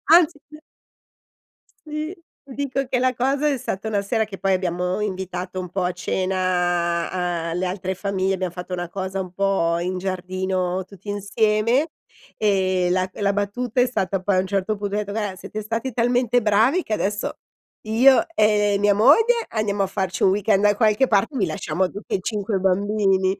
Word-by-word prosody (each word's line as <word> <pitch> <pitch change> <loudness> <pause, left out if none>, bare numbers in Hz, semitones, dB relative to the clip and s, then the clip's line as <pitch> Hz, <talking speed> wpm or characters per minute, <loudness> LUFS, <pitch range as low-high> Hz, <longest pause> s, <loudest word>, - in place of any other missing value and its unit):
Anzi 340 -3 +4 1.5
Sì, 305 +4 -4 0.3
ti 275 - -11
dico 275 -1 -1
che 255 - 0
la 255 +1 +2
cosa 270 +4 +1
è 290 - +2
stata 215 -1 -4
una 205 -2 0
sera 220 +2 0
che 200 -3 -9
poi 195 -1 +1
abbiamo 180 +1 -1
invitato 185 -2 -4
un 180 -1 -5
po' 185 +1 -2
a 180 - +1
cena 175 -2 -1
a - - -2
le 180 +2 -1
altre 185 0 -3
famiglie, 195 0 -1
abbiam 185 -1 -2
fatto 180 +1 -7
una 175 -1 -3
cosa 190 +1 -4
un 185 -1 -7
po' 185 -3 +1
in 180 +2 -2
giardino 185 0 -2
tutti 200 +1 -12
insieme 215 - +1 0.5
e 190 -3 +2
la 185 +1 +1
e - - -9
la 200 0 +2
battuta 210 +5 -1
è - - +5
stata 195 -6 -1
poi 185 0 +1
a - - +4
un 190 - -1
certo 200 +2 -1
punto 200 0 -3
ho - - +1
detto: 205 -1 -3
"Guarda, 205 -3 -2
siete 215 +3 -7
stati 225 +4 -3
talmente 245 +1 +2
bravi 225 - +3
che 220 - -4
adesso 205 0 -2 0.4
io 245 +5 +5
e 210 -5 +3
mia 205 0 +3
moglie 450 - +5
andiamo 205 -2 0
a 195 - 0
farci 190 -1 -2
un 190 - +5
weekend 200 0 +2
da 205 0 +4
qualche 215 +3 +3
parte 210 +7 +1
e - - -1
vi 195 - +2
lasciamo 165 +2 -1
tutti 205 - -4
e - - -1
5 205 0 -2
bambini." 195 0 +1
200 Hz, 185 wpm, -22 LUFS, 185-220 Hz, 1.5 s, è